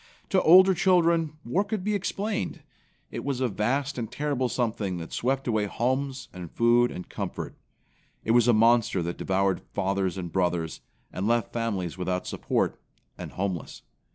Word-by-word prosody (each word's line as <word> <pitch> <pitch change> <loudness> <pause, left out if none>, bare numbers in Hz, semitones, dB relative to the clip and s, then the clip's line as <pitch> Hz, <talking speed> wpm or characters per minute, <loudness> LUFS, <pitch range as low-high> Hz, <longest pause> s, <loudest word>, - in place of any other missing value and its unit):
To 190 -3 +3
older 185 +3 +8
children 170 -3 +2
war 170 +12 +1
could 210 -2 -3
be 210 +2 0
explained. 205 +1 -2 0.5
It - - -5
was 140 -3 -2
a 130 - +2
vast 130 +7 -1
and 115 -1 -4
terrible 135 -2 -1
something 110 -7 -1
that 85 -1 -7
swept 135 +2 -1
away 110 -3 +1
homes 130 +4 -1
and 90 -2 -8
food 120 +1 +4
and 90 - -7
comfort. - - -5 0.7
It 115 - 0
was 120 0 +5
a - - +7
monster 115 -4 +3
that 85 +1 -4
devoured 95 0 +1
fathers 95 -1 0
and 90 -2 -5
brothers, 90 -3 -1 0.3
and 95 +3 -2
left 120 0 +1
families 100 -7 -2
without 90 0 -1
support, - - -1 0.3
and - - -8
homeless. 95 -3 -4
120 Hz, 160 wpm, -27 LUFS, 95-140 Hz, 0.7 s, older